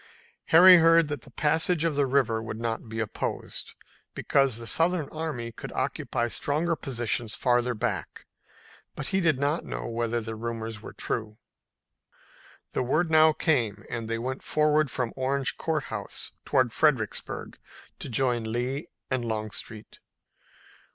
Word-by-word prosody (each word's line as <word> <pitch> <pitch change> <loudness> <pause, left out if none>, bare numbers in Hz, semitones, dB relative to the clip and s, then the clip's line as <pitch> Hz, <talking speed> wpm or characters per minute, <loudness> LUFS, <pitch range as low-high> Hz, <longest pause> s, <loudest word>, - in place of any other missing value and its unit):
Harry 180 +3 +9
heard 165 -1 +5
that 145 -4 -3
the 130 - -13
passage 160 +5 +1
of 165 - +1
the 140 -1 +2
river 125 -4 +2
would 110 0 -6
not 115 0 -3
be 110 0 -4
opposed, 110 -2 -4 0.4
because 135 -4 +2
the 115 - -7
Southern 165 +3 +1
army 150 -7 -4
could - - -8
occupy 120 0 -1
stronger 155 +7 0
positions 120 -5 -2
farther 125 0 +1
back, 105 - -3 0.7
but - - -4
he 195 0 +1
did 160 -5 +3
not 145 +4 0
know - - -5
whether 115 0 -1
the 110 0 -5
rumors 115 -1 -5
were - - -9
true. 110 -1 -4 1.3
The - - -1
word 155 +7 +1
now 155 0 +7
came, 130 - 0
and 115 -2 -3
they 115 - -1
went 130 +3 -4
forward 150 -1 +2
from 125 -2 -2
Orange 135 +1 -1
Court 155 -3 -1
House - - -4
toward 125 -3 +2
Fredericksburg 135 -9 0 0.4
to - - -6
join 120 -3 0
Lee 130 +7 -2 0.2
and 130 -2 0
Longstreet. 110 -1 -5
130 Hz, 145 wpm, -27 LUFS, 115-155 Hz, 1.3 s, Harry